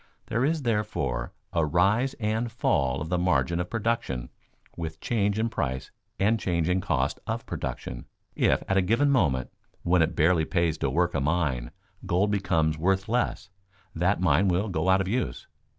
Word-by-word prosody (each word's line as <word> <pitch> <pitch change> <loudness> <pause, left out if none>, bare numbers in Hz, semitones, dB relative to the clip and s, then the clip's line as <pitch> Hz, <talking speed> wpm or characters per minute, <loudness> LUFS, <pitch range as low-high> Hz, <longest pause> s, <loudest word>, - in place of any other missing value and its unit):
There 115 +3 +1
is, 155 +1 +1
therefore, 105 - -1 0.2
a 85 - +2
rise 100 - +2
and 110 +1 -1
fall 70 - +1
of 80 - -4
the 90 0 +1
margin 85 -2 +1
of 90 - -3
production 110 - -2 0.5
with 80 -1 -5
change 105 -1 0
in 110 +1 +1
price 65 - -3 0.3
and 110 +3 +2
change 85 -4 0
in 90 +1 +1
cost - - 0
of - - -3
production. - - -5 0.3
If - - +2
at 95 - +1
a - - +5
given 115 +10 +2
moment, 70 - +1 0.3
when 90 0 +3
it 80 - +1
barely 80 0 +3
pays 85 -3 0
to 70 - 0
work 85 +5 +1
a - - 0
mine, 70 -5 0 0.4
gold 95 +4 +2
becomes 80 -6 +1
worth 95 +4 +1
less, 120 -4 -1 0.4
that 90 +4 +1
mine 95 +1 +3
will 95 +4 +1
go 90 0 0
out 95 +1 +5
of 95 - -2
use. 110 - -2
90 Hz, 175 wpm, -27 LUFS, 80-105 Hz, 0.5 s, a